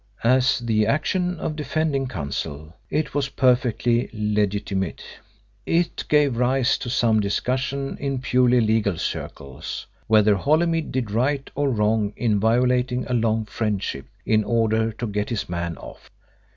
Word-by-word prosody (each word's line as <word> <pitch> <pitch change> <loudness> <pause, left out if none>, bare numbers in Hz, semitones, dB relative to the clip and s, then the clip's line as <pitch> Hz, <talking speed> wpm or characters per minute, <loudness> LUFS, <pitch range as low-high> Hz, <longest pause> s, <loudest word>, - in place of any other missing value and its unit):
As 130 +2 +4
the 110 -3 +1
action 180 - 0
of 155 - -3
defending 150 -2 -1
counsel 75 - -5 0.2
it 155 - -1
was 140 -1 0
perfectly 125 -2 +2
legitimate. 105 -3 -1 0.6
It 170 +6 0
gave 145 -5 +3
rise 125 +1 +2
to 120 - -5
some 115 -3 +2
discussion 130 +6 -1
in 140 -1 -2
purely 125 -1 +3
legal 110 -4 +1
circles 70 -2 -5 0.2
whether 105 -1 +5
Holymead 160 - +1
did 120 -5 -2
right 135 +5 0
or 145 0 0
wrong 105 -2 +1
in 110 -4 +1
violating 125 +3 +2
a 125 - -3
long 110 -2 +1
friendship 105 -11 -3 0.2
in 110 -1 +3
order 115 0 +1
to 120 - -5
get 105 -1 -2
his 115 -4 -2
man 85 -1 -3
off. - - -12
120 Hz, 140 wpm, -23 LUFS, 105-135 Hz, 0.6 s, whether